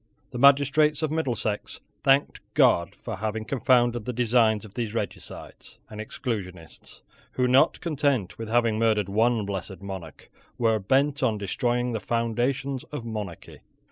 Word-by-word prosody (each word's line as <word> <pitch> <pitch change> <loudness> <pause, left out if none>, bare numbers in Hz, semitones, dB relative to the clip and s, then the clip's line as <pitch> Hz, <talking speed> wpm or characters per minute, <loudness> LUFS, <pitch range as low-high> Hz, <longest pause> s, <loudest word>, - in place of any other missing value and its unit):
The 125 - -5
magistrates 145 +3 +4
of 155 - 0
Middlesex 125 -9 -2 0.2
thanked 135 +1 +3 0.2
God 85 0 +3
for - - -7
having 110 +1 -3
confounded 120 -2 +2
the 125 - -3
designs 115 -2 +2
of 100 - -13
those 115 -2 -4
regicides - - -7
and 105 0 -6
exclusionists 95 - -6 0.3
who, 125 -1 +1
not 130 +2 +4
content 140 - -1
with 115 - -5
having 115 -2 +2
murdered 110 -4 +2
one 110 +1 +2
blessed 100 0 -6
monarch, 95 -6 -9 0.3
were 115 -3 +2
bent 135 +8 +1
on 115 -5 +1
destroying 120 +4 -1
the 110 - -2
foundations 120 +4 -1
of 145 -6 -7
monarchy. 105 -6 -7
115 Hz, 140 wpm, -26 LUFS, 105-130 Hz, 0.3 s, magistrates